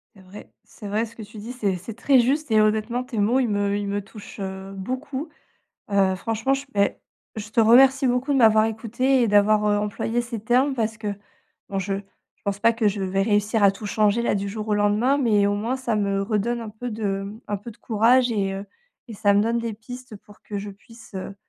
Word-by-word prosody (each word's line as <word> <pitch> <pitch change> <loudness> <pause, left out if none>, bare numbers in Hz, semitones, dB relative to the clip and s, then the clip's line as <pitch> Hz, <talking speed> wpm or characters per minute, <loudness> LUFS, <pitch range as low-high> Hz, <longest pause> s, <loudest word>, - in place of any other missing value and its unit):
C'est 195 - -16
vrai. 190 +2 -13
C'est 210 - -11
vrai 215 +3 0
ce 230 - -14
que 225 - -8
tu 215 +1 -11
dis, 230 +4 -7
c'est 205 -7 -1
c'est 195 +5 -8
très 260 +3 +4
juste 275 +3 +1
et 215 -1 +5
honnêtement 220 +3 +1
tes 250 -2 -7
mots, 220 +5 +3
ils 255 - +1
me 205 -1 0
ils 205 0 -2
me 200 +1 -1
touchent, 205 +1 -12
heu, 190 0 -6
beaucoup. 260 - -5 0.6
Heu, 195 -2 +3
franchement, 225 +7 -1
je 275 0 -4
beh, 200 0 +1 0.4
je 215 0 -6
te 230 - +2
remercie 265 +4 +6
beaucoup 250 +3 +1
de 275 - +2
m'avoir 220 -2 +6
écouté, 235 +4 0
et 235 - +2
d'avoir, 210 +1 +4
heu, 205 - +3
employé 210 +3 -1
ces 235 -2 -6
termes 250 +5 +2
parce 220 -2 -1
que 215 -1 -5 0.6
bon 195 - -3
je 195 +1 -2
je 195 0 -15
pense 200 0 -2
pas 230 +2 +4
que 225 -2 +1
je 200 0 -3
vais 190 +1 -1
réussir 210 +1 +1
à 200 - +7
tout 195 +2 -10
changer 215 +2 +2
là - - +1
du 200 0 -2
jour 215 +1 -5
au 210 - +2
lendemain, 210 +7 +2
mais 215 -6 +3
au 205 - +1
moins 225 +5 -2
ça 245 -4 -2
me 200 -1 0
redonne 220 +3 -1
un 220 - -7
peu 240 +3 -6
de 200 -3 -2 0.2
un 205 - -2
peu 210 +4 -9
de 220 - -15
courage 235 +3 +3
et 195 -3 -1
heu 195 +1 -5 0.4
et 230 - -7
ça 205 -1 +2
me 205 - +4
donne 230 +2 0
des 230 -2 -3
pistes 245 +1 -10
pour 205 +1 -19
que 210 - -6
je 200 +1 -5
puisse, 220 +3 -16
heu 190 +1 -6
215 Hz, 235 wpm, -23 LUFS, 205-235 Hz, 0.6 s, à